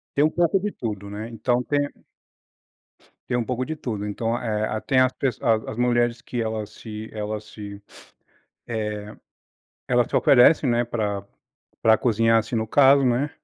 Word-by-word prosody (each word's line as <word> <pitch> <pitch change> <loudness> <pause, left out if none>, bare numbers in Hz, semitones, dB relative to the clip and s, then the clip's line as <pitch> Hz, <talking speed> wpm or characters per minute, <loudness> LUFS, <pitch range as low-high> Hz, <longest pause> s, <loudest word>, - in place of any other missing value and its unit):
Tem 145 - +4
um 155 - +3
pouco 175 +2 +2
de 210 +1 -2
tudo, 100 -4 -5
né. 105 +2 -6
Então 120 +2 0
tem 145 +1 0 1.4
Tem 120 - 0
um 120 - -1
pouco 125 +1 -2
de 160 - -4
tudo. 110 -8 -4
Então, 115 +3 -2
eh, 110 -3 -1
a 110 - -3
tem 130 - +1
as 130 0 +3
pesso 130 -5 -3
as 110 -2 +2
as 110 - -6
mulheres 120 -1 +1
que 120 -1 -4
elas 110 -2 -3
se 110 -1 -8
elas 105 0 -4
se 100 -1 -10 0.9
eh, 105 -2 -4 0.7
elas 125 -1 +3
te - - -10
oferecem, 135 +2 +5
né, 120 0 +2
pra 105 -4 -3 0.6
pra 110 0 +6
cozinhar, 115 0 +3
assim, 115 +2 -2
no 110 0 -1
caso, 140 +3 +5
né, 130 +4 +1
115 Hz, 175 wpm, -24 LUFS, 110-125 Hz, 1.4 s, pra